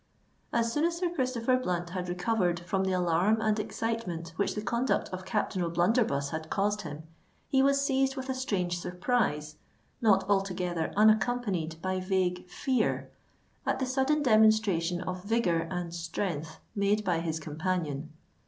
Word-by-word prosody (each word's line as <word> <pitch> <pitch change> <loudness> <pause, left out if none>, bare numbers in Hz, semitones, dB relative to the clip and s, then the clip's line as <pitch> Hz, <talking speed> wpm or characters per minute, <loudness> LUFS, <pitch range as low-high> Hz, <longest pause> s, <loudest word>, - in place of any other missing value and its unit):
As 230 0 +1
soon 295 - +1
as 340 0 0
Sir 350 -1 -1
Christopher 255 -4 +1
Blunt 175 -8 -2
had 180 -1 -3
recovered 180 -1 0
from 190 +2 -1
the 190 - 0
alarm 180 +4 +2
and 220 -1 +1
excitement 215 -6 -3
which 200 - 0
the 210 - -2
conduct 240 +3 0
of 185 0 -6
Captain 205 -2 -1
O'Blunderbuss 170 - +1
had 160 0 -5
caused 205 +1 0
him, 150 -3 -7 0.4
he 265 -2 +3
was 275 +1 +4
seized 270 -1 +1
with 265 -1 -5
a 265 - 0
strange 185 -9 -1
surprise, 180 -6 -1 0.4
not 195 -4 +4
altogether 180 -4 0
unaccompanied 215 -7 +2
by 185 0 0
vague 185 -1 0
fear, 250 +3 0 0.5
at - - 0
the 265 - -1
sudden 265 +4 +1
demonstration 215 - +4
of 185 0 -4
vigour 185 -7 +1
and 180 -2 -4
strength 165 -2 -3 0.2
made 205 +1 +1
by 175 -3 +1
his 165 -1 -2
companion. 155 -1 -3
190 Hz, 155 wpm, -29 LUFS, 175-230 Hz, 0.5 s, was